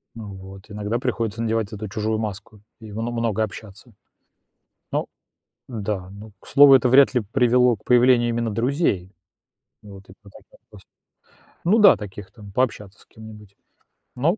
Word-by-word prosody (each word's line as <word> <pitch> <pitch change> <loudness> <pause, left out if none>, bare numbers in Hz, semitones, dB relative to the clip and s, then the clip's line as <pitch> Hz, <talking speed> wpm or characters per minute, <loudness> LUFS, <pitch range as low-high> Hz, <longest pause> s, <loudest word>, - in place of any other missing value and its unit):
Ну 105 -3 -9
вот, 95 +1 -12
иногда 105 +2 -3
приходится 115 -3 -3
надевать 110 -2 -2
эту 105 0 -6
чужую 110 +2 -2
маску, 105 0 -7 0.2
и 110 -1 -11
мно 115 +3 -4
много 115 -2 -1
общаться. 100 -2 -11 1.0
Ну - - -1 0.6
да, 105 -6 -4
ну, 105 +2 -12
к - - -20
слову, 140 -1 +7
это 130 -1 +4
вряд 135 +3 +5
ли 125 - +2
привело 125 +2 +2
к - - -28
появлению 125 -1 +4
именно 115 -1 -2
друзей. 115 - -1 0.7
Вот, 100 -3 -14
и - - -13
по 105 - -16
таких - - -19
просто, - - -17 0.8
ну 195 +7 +3
да, 205 -2 +7
таких 100 -1 -10
там, 105 -2 -14
пообщаться 105 -4 -2
с - - -21
кем-нибудь. 105 -2 -14 0.6
Но 160 +10 0
110 Hz, 160 wpm, -22 LUFS, 100-120 Hz, 1.0 s, слову